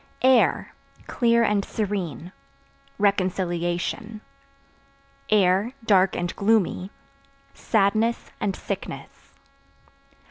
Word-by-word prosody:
Air 260 -2 +3 0.3
(Clear 235 -2 +2
and 210 -2 +1
serene) 185 - -4 0.7
reconciliation; 185 +2 -1 1.6
(dark 190 -3 +3
and 175 0 -3
gloomy) 200 -3 +1 0.6
sadness 220 +2 0
and 195 -2 -1
sickness. - - -8
200 Hz, 65 wpm, -24 LUFS, 185-220 Hz, 1.6 s, Air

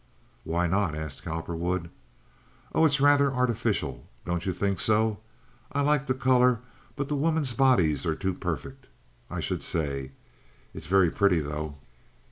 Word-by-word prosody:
"Why 85 +2 0
not?" 90 -2 +1
asked 80 -3 -6
Cowperwood. 85 +2 -3 0.8
"Oh, 160 - +4
it's 140 -2 +2
rather 140 0 +5
artificial; 125 -3 -1 0.2
don't 85 +1 -2
you - - +2
think 95 +1 -1
so? 110 -1 +2 0.5
I 140 - +1
like 145 -1 +2
the 130 - +1
color, 125 -2 +3 0.3
but 140 -1 -3
the 150 - -1
women's 150 -3 +1
bodies 105 - +3
are 80 - +1
too 95 +1 -2
perfect, 115 +11 -5 0.4
I - - -4
should - - -2
say. 70 -4 -3 0.6
It's - - -8
very 95 -2 +4
pretty, 100 -4 +3
though." 75 0 -4
100 Hz, 145 wpm, -27 LUFS, 80-135 Hz, 0.8 s, rather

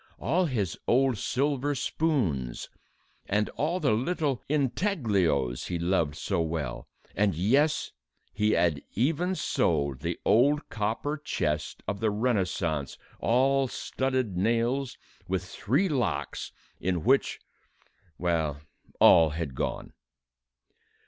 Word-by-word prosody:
All 175 +8 +1
his 105 - -2
old 130 -3 +3
silver 140 +3 0
spoons 105 - -1 0.6
and 105 +1 +1
all 165 +5 -1
the - - +2
little 140 +3 0
intaglios 115 - +1
he 90 - -2
loved 85 -3 0
so 80 - -1
well, 80 -6 -3 0.3
and 100 -3 +2
yes! 140 - +2 0.4
he 105 0 +2
had 85 -4 +2
even 165 - +1
sold 70 - 0
the - - -3
old 145 +7 +3
copper 115 +8 -2
chest 75 - -2
of 100 +1 -2
the 110 - +1
Renaissance, 95 - -1 0.2
all 135 +3 +3
studded 130 -5 -2
nails, 120 +7 0 0.3
with 95 0 -1
three 130 - 0
locks, 105 - -2 0.3
in 90 -3 -1
which... 135 +4 +2 0.8
well, 80 -5 0 0.4
all 80 -1 +7
had 80 -5 -3
gone. - - -4
110 Hz, 110 wpm, -28 LUFS, 85-135 Hz, 0.8 s, all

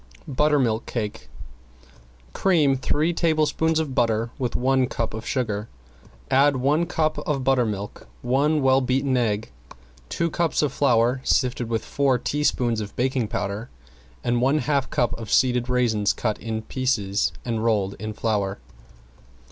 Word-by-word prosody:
~BUTTERMILK 135 -5 +1
CAKE 115 -2 -4 1.0
~Cream 155 -8 +3
three 150 +5 0
tablespoons 160 -1 +1
of 155 -4 -1
butter 115 -2 +1
with 125 -3 -2
one 130 0 +2
cup 115 -3 -3
of 110 +1 -7
sugar, 110 -5 -2 0.6
add 140 +1 +4
one 145 +6 +1
cup 155 -2 0
of 140 -3 -2
buttermilk, 115 -7 -1 0.2
one 140 +4 +2
well 135 0 +4
beaten 130 +1 0
egg, 110 - -1 0.6
two 170 -1 -1
cups 170 -2 0
of 140 -3 0
flour 125 -2 +2
sifted 125 -3 0
with 115 -1 -2
four 140 -3 +1
teaspoons 125 -4 0
of 105 -1 -7
baking 130 -2 0
powder 105 +4 -4 0.5
and 120 0 +1
one 135 +4 +3
half 140 -1 0
cup 120 - 0
of 110 -3 -7
seeded 125 -1 +2
raisins 115 -5 +2
cut 110 -3 -2
in 110 0 -4
pieces 105 -7 0
and 115 -2 -2
rolled 105 -4 +1
in 110 +1 -4
flour. 100 -3 -1
125 Hz, 140 wpm, -24 LUFS, 110-140 Hz, 1.0 s, add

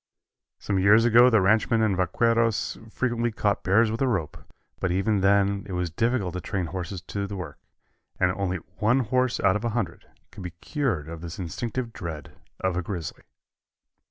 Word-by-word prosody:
Some 100 -2 -1
years 105 +4 +6
ago 120 +2 +7
the 110 -4 +4
ranchmen 110 +3 +3
and 105 -3 +2
vaqueros 115 +5 +1
frequently 120 0 -1
caught 105 -2 0
bears 110 +4 +3
with 115 - -4
a 135 - +3
rope, 95 - -1 0.4
but 95 - 0
even 95 +2 +1
then 100 0 +3
it - - -4
was 90 -2 -2
difficult 115 -3 0
to 90 - -4
train 95 0 -2
horses 90 +2 -5
to 100 +1 -4
the 100 - -6
work, 85 -7 -7 0.6
and 90 - +3
only 95 -1 -2 0.2
one 115 +5 +3
horse 125 +1 +1
out 95 -1 +3
of 105 - -2
a 120 - 0
hundred 115 - -3 0.2
could - - -10
be 90 -2 -6
cured 120 - -2
of 80 0 -7
his 85 -1 -7
instinctive 115 +7 -4
dread 80 -5 -7 0.3
of 95 -2 0
a 90 - 0
grizzly. 85 -3 -6
100 Hz, 185 wpm, -26 LUFS, 90-115 Hz, 0.6 s, ago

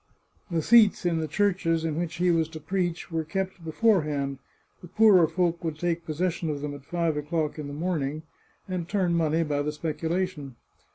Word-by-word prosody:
The 165 -3 -1
seats 215 -3 +5
in 170 -2 +1
the 160 - -2
churches 165 -3 +1
in 160 -2 -1
which 170 0 -3
he 180 0 +2
was 165 -2 +1
to 160 -1 -8
preach 175 +2 -2
were 165 -1 -1
kept 190 +2 -4
beforehand; 155 - +1 0.4
the 175 - -10
poorer 190 -2 +5
folk 170 +1 -1
would 160 -2 -3
take 170 0 -2
possession 165 +1 -1
of 145 -2 -3
them 145 0 -4
at 140 -1 -10
five 170 -1 -1
o'clock 155 +1 -2
in 150 - -5
the 145 - -7
morning, 155 -2 -2 0.4
and 180 -2 -4
turn 185 -4 +1
money 165 0 +2
by 145 -2 -1
the 150 +1 -1
speculation. 160 -2 -3
165 Hz, 185 wpm, -27 LUFS, 155-180 Hz, 0.4 s, seats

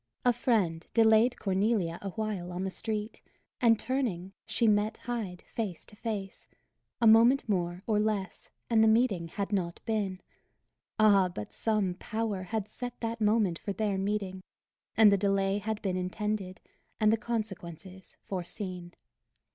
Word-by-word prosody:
A 245 - +5
friend 200 -9 0
delayed 225 +2 +5
Cornelia 195 -3 0
a 200 - -4
while 200 -3 -3
on 180 +1 -3
the 190 - -2
street; 215 +1 -4 0.4
and 230 -2 +5
turning, 215 -8 -2
she 225 +1 +2
met 210 +1 +2
Hyde 220 -7 -5
face 205 -7 -5
to - - -14
face; 205 -3 -5 0.5
a 235 - +2
moment 230 +5 +6
more, 180 -2 -1
or 215 -2 +2
less, 210 -4 -2 0.2
and 225 -2 +4
the - - +5
meeting 220 -6 +3
had 200 +4 -4
not 175 -3 -1
been. 205 -4 -1 0.8
Ah, 200 -3 +5
but 105 -12 -7
some 210 -5 0
Power 220 -3 -2
had 200 +3 -3
set 245 +2 -7
that 230 -1 -3
moment 210 -5 +2
for 200 - -4
their 205 -2 -1
meeting, 195 -1 -2 0.6
and 215 -2 +8
the 200 - +3
delay 195 0 +1
had 215 +1 -3
been 185 -2 0
intended, 190 0 -3 0.4
and 215 0 +4
the - - +5
consequences 190 -5 -6
foreseen! 180 -1 -5
210 Hz, 150 wpm, -30 LUFS, 185-220 Hz, 0.8 s, and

